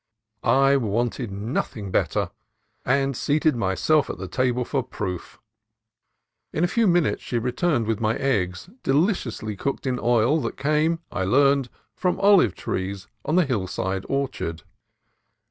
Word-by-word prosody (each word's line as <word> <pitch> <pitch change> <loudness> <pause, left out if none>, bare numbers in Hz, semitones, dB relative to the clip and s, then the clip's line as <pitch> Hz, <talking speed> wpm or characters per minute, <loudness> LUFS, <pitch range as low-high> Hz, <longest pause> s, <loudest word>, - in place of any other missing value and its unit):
I 135 +3 +4
wanted 120 0 -1
nothing 100 0 -3
better, - - 0 0.5
and 135 +1 +1
seated 150 +3 +1
myself 115 - +2
at - - -4
the - - -6
table 125 -2 0
for 135 +1 0
proof. 95 -7 -6 1.1
In 160 - -1
a - - +4
few 230 +3 +2
minutes 175 -4 +2
she 120 - -3
returned 125 +2 0
with 110 -1 -1
my 110 0 +1
eggs, 95 - -1
deliriously 135 - 0
cooked 140 +8 -3
in 125 -2 -1
oil 120 +6 +3
that 115 - -4
came, 155 +4 +1
I 95 - -2
learned, 135 +4 +3 0.2
from 180 -1 0
the - - -7
olive 195 - +5
trees 95 +1 -4 0.2
in 155 - +1
the 180 -2 +4
hillside 95 -5 -2
orchard. 130 -12 -2
125 Hz, 145 wpm, -24 LUFS, 105-145 Hz, 1.1 s, olive